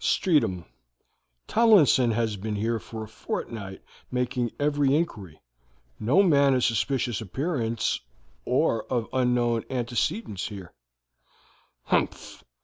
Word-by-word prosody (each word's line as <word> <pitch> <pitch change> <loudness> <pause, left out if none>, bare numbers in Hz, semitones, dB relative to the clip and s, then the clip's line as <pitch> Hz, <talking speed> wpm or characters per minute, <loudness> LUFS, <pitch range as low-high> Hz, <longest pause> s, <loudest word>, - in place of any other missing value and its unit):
"Streatham. 95 - +1 0.8
Tomlinson 200 - +5
has 115 -1 0
been 105 +2 -4
here 115 +3 0
a - - -9
fortnight 110 0 -6 0.3
making 125 -1 -1
every 145 -1 +2
inquiry. 100 - -3 0.6
'No 140 - +4
man 140 -6 +4
of 125 - +1
suspicious 120 0 0
appearance 115 - -1 0.4
or 115 - +1
of 120 -3 0
unknown 125 -2 +1
antecedents 115 -4 -2
here.' 100 -5 -9 1.1
"Humph! - - -2
120 Hz, 100 wpm, -26 LUFS, 110-135 Hz, 1.1 s, Tomlinson